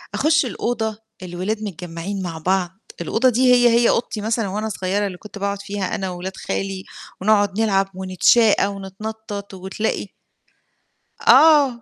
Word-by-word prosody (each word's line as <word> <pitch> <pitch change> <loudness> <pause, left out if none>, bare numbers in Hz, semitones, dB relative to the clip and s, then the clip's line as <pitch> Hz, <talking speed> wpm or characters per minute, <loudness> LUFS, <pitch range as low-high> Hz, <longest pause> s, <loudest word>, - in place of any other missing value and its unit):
أخُشّ 310 -1 +3
الأوضة، 225 -3 -2 0.3
الولاد 185 +5 -3
متجمّعين 180 0 -5
مع 170 -3 -5
بعض، 180 +2 0 0.3
الأوضة 255 +3 +2
دي 250 +1 +4
هي، 245 -1 +5
هي 235 0 +4
أوضتي 230 -2 -1
مثلًا 220 0 -1
وأنا 210 +3 -3
صغيرة، 200 +1 -1
اللي 185 -2 -7
كنت 205 +1 -11
باقعد 200 0 -2
فيها 200 -2 -3
أنا 190 -1 -3
وولاد 180 +1 -6
خالي 195 -1 -4 0.4
ونقعد 205 0 +2
نلعب 195 -3 +2
ونتشاقى 190 +4 +3
ونتنطَّط 200 +1 -7
وتلاقي 190 +3 -3 1.2
آه، 285 -7 +6
200 Hz, 135 wpm, -21 LUFS, 190-220 Hz, 1.2 s, آه